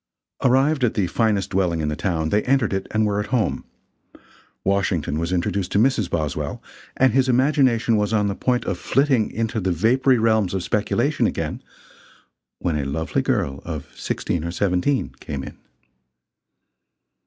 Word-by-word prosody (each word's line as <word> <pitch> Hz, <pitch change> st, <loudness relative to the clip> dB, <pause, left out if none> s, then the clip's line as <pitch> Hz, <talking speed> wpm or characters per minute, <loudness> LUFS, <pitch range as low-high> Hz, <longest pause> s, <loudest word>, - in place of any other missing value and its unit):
Arrived 135 Hz, +3 st, +3 dB
at 120 Hz, -, +1 dB
the 100 Hz, -, +1 dB
finest 105 Hz, +1 st, 0 dB
dwelling 90 Hz, -3 st, +1 dB
in 75 Hz, -, -1 dB
the 75 Hz, -, -1 dB
town, 80 Hz, 0 st, -1 dB
they 105 Hz, +4 st, +2 dB
entered 130 Hz, -5 st, +2 dB
it 95 Hz, 0 st, -2 dB
and 110 Hz, 0 st, +1 dB
were 105 Hz, -1 st, 0 dB
at 105 Hz, -, -3 dB
home. 120 Hz, -3 st, -1 dB, 1.0 s
Washington 95 Hz, -6 st, 0 dB
was 85 Hz, +2 st, -2 dB
introduced 90 Hz, +1 st, -1 dB
to -, -, +1 dB
Mrs. 110 Hz, -4 st, +2 dB
Boswell, 75 Hz, -4 st, -2 dB, 0.4 s
and 130 Hz, -3 st, +4 dB
his 130 Hz, 0 st, +3 dB
imagination 130 Hz, -3 st, +3 dB
was 105 Hz, 0 st, 0 dB
on 105 Hz, -2 st, +2 dB
the 100 Hz, -, 0 dB
point 125 Hz, +4 st, 0 dB
of 90 Hz, -, -2 dB
flitting 135 Hz, -4 st, +2 dB
into 115 Hz, 0 st, -2 dB
the 95 Hz, -2 st, 0 dB
vapory 125 Hz, -, +3 dB
realms 110 Hz, -4 st, +2 dB
of 95 Hz, -, -2 dB
speculation -, -, +1 dB
again, -, -, -3 dB, 1.0 s
when 80 Hz, -4 st, -1 dB
a -, -, -1 dB
lovely 80 Hz, +4 st, -1 dB
girl 70 Hz, 0 st, -1 dB
of 80 Hz, -4 st, -6 dB
sixteen 85 Hz, -3 st, -2 dB
or 85 Hz, -, -3 dB
seventeen 90 Hz, -, 0 dB
came 70 Hz, -3 st, -5 dB
in. -, -, -10 dB
105 Hz, 165 wpm, -22 LUFS, 85-120 Hz, 1.0 s, and